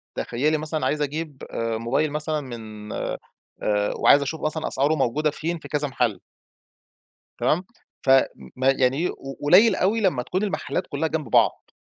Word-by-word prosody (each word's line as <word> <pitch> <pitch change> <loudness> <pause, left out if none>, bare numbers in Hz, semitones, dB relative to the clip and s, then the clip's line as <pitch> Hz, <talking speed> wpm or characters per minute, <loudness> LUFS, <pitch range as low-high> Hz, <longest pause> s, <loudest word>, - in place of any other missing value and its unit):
تخيلّي 150 +6 0
مثلًا 155 -2 -2
عايز 150 +3 0
أجيب 150 -1 -4
آآ 115 -1 -2
mobile 135 +7 0
مثلًا 150 +1 -2
من 110 -5 -9
آآ، - - -3 0.8
وعايز 145 - +5
أشوف 155 +3 -4
مثلًا 155 +1 -1
أسعاره 140 +4 +1
موجودة 150 +2 +1
فين 165 +3 -3
في - - -10
كذا 150 0 0
محل. 120 -8 -1 1.2
تمام، 175 +5 +2 0.4
ف - - +4 0.5
م 130 - -4
يعني 130 -1 +3
إيه 175 +3 +1
ق 135 +1 -9
قليّل 190 +10 +6
أوي 210 +5 +1
لمّا 180 - +1
تكُون 185 +10 -2
المحلّات 195 -2 -2
كلّها 155 +2 -2
جنب 155 -2 -3
بعض، - - +2
150 Hz, 160 wpm, -24 LUFS, 130-160 Hz, 1.2 s, قليّل